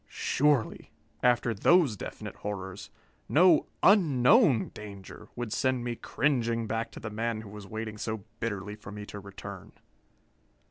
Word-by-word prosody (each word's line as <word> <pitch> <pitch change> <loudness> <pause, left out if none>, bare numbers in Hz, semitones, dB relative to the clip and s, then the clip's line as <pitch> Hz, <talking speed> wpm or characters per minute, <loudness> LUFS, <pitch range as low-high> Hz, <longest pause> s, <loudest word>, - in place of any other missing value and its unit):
Surely, 145 -5 +1 0.3
after 120 -1 +3
those 145 - +4
definite - - -7
horrors, 95 -2 -6 0.4
no 170 0 +5 0.2
unknown 140 - +5
danger 105 0 -10
would 120 -3 -4
send 130 -2 +1
me 120 -1 -2
cringing 115 -4 0
back 115 +1 -2
to - - -9
the 110 - -6
man 110 +1 -2
who 110 - -11
was 105 -1 -10
waiting 110 0 -5
so 110 -2 -3 0.2
bitterly 105 -2 -3
for 105 -2 -10
me 105 0 -7
to 105 - -8
return. 100 0 -10
115 Hz, 140 wpm, -29 LUFS, 105-125 Hz, 0.4 s, no